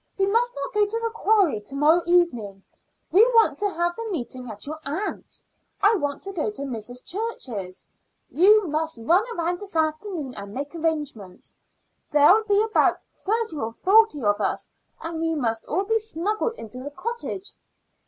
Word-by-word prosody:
We 390 - +3
must 465 +5 +2
not 280 0 -5
go 420 0 +3
to 455 +3 -2
the 460 0 -2
quarry 400 - +2
to 270 +6 -7
morrow 310 +5 +4
evening. 240 - +1 0.5
We 400 +5 +7
want 455 - +4
to 410 -1 +1
have 345 -2 -1
the 460 -1 -5
meeting 255 - -5
at 210 -2 -7
your 310 +2 -6
aunt's. 315 +10 -5 0.4
I 420 +2 +5
want 290 -7 -3
to 390 - -4
go 310 - -1
to 240 +7 -6
Mrs. 245 -1 -5
Church's. 250 - -4 0.4
You 415 +5 +5
must 315 -1 -2
run 335 - +3
round 345 +1 -1
this 400 -4 -8
afternoon 315 -2 -1
and 200 -1 -9
make 285 +3 -5
arrangements. 300 - -4 0.6
There'll 300 +9 +6
be 410 0 +3
about 440 0 +2 0.2
thirty 440 -4 -2
or 225 -4 -3
forty 395 - +4
of 205 0 +2
us, - - -2 0.3
and 330 0 -5
we 325 0 0
must 225 -6 -2
all 370 +5 0
be 450 +2 +1
smuggled 430 +3 -2
into 230 - -9
the 270 +3 -6
cottage." 405 +3 -5
330 Hz, 175 wpm, -24 LUFS, 265-415 Hz, 0.6 s, We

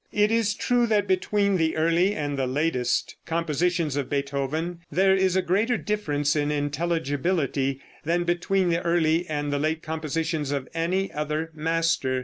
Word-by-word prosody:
It 210 +1 +2
is 225 -3 +2
true 245 0 +2
that 210 -2 +2
between 200 +1 +1
the 160 -2 0
early 170 +5 +2
and 145 -1 -2
the 135 -2 -1
latest 130 -2 0
compositions 165 -1 0
of 140 -3 -2
Beethoven 140 +5 -2
there 190 +5 +4
is 190 -1 +2
a 190 - +2
greater 220 +7 +1
difference 150 -10 -1
in 145 -1 +1
intelligibility 145 -2 -1 0.2
than 170 +3 +1
between 175 +2 +1
the 170 0 +1
early 170 0 +2
and 145 -1 -2
the 145 - 0
late 155 +2 -1
compositions 160 -1 -2
of 140 -2 -2
any 180 +4 0
other 150 +2 -2
master. 160 -4 0
165 Hz, 155 wpm, -25 LUFS, 145-185 Hz, 0.2 s, there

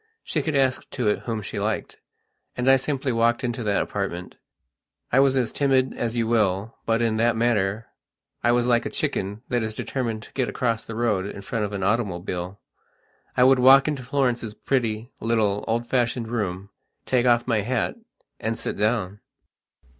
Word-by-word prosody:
She - - -1
could 155 -2 -2
ask 130 -1 +1
to 125 -5 -2
it 105 - +1
whom 110 -3 -3
she - - -5
liked, - - -2 0.6
and 125 +1 -1
I 135 - +8
simply 135 0 -2
walked 115 +1 +2
into 120 0 -2
that 100 -1 +2
apartment. 90 -3 -4 0.7
I 125 - +4
was 135 -1 +4
as 125 -3 +1
timid 135 -2 +2
as 120 0 -2
you 115 - +1
will, 110 -2 +1
but 115 +1 +2
in 110 -1 +1
that 115 +1 +2
matter 110 -2 +1 0.6
I 120 - +4
was 120 0 +2
like 120 -1 +3
a - - -4
chicken 100 +4 -2
that 120 -2 +1
is 110 -1 -3
determined 115 -5 -3
to - - -15
get 130 -3 0
across 115 -2 -1
the 115 - -7
road 105 -5 0
in 100 - -7
front 110 +1 -2
of 105 - -5
an 100 -2 -3
automobile. 95 -3 -2 0.8
I 125 - +6
would 130 0 +6
walk 135 +2 +7
into 150 -3 -1
Florence's 125 -4 -1
pretty, 115 -2 -1
little, 110 -3 +1
old 115 +1 0
fashioned 120 -2 0
room, 100 -4 -3 0.3
take 125 -1 +2
off 120 -1 +4
my 115 -4 +1
hat, 120 +2 -1 0.5
and 110 +1 -2
sit - - -4
down. 105 -2 0
115 Hz, 185 wpm, -24 LUFS, 105-125 Hz, 0.8 s, I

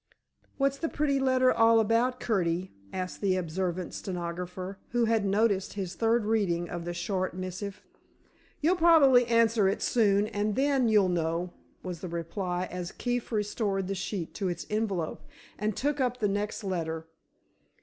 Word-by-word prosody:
"What's 275 0 +1
the 325 - -1
pretty 280 -2 +1
letter 260 -1 +3
all 225 0 +5
about, 230 +3 +2
Curtie?" 180 -4 0 0.2
asked 185 -1 -5
the 195 -2 +2
observant 180 0 -2
stenographer, 180 +1 -5
who 240 -1 +3
had 225 -2 +2
noticed 200 -1 +1
his 190 -3 -4
third 225 +3 +1
reading 190 -6 +1
of 170 -1 -5
the 175 - -3
short 185 0 -2
missive. 185 +2 -6 0.8
"You'll 345 +5 +3
probably 285 -8 +6
answer 230 -3 +3
it 195 - -2
soon, 205 -3 +3
and 210 0 -1
then 270 -2 +2
you'll 205 -4 +4
know," 170 +1 -1 0.3
was 180 -3 -5
the 185 - -5
reply, 175 +2 -3
as 180 0 -5
Keefe 245 -1 -3
restored 210 -3 -1
the 195 - -1
sheet 190 -2 -4
to 195 - -2
its 175 - -3
envelope 200 -7 -1 0.4
and 210 0 -1
took 290 +1 0
up 250 -1 0
the 215 - +1
next 205 +2 -2
letter. 165 -4 -3
200 Hz, 160 wpm, -29 LUFS, 180-230 Hz, 0.8 s, probably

